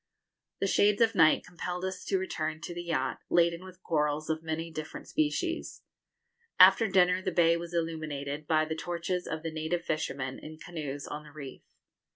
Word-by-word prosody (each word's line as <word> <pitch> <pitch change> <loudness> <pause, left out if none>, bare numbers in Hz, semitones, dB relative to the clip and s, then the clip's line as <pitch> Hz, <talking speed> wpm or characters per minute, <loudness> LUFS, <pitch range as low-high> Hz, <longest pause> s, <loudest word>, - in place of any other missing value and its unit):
The - - +1
shades 205 +1 +3
of 230 -1 +4
night 165 -5 +5
compelled 180 +1 -4
us 190 -1 -4
to 195 - +1
return 155 -4 -3
to 175 - -5
the 175 - -5
yacht, 165 -6 -1
laden 170 0 +3
with 185 -1 -13
corals 150 0 0
of 160 0 -2
many 165 +1 -4
different 155 -1 -7
species. 155 - -1 0.8
After 195 +4 +8
dinner 185 -1 +4
the 185 - -1
bay 170 -1 +4
was 170 0 -5
illuminated 155 -3 -3
by 155 -1 +3
the 160 - -3
torches 175 +2 -3
of 160 - -4
the 165 - -3
native 160 +2 -2
fishermen, 140 -4 -2
in 155 0 -10
canoes, 150 -4 -6
on 150 - -6
the 150 - -14
reef. 140 -3 -9
165 Hz, 180 wpm, -30 LUFS, 155-180 Hz, 0.8 s, After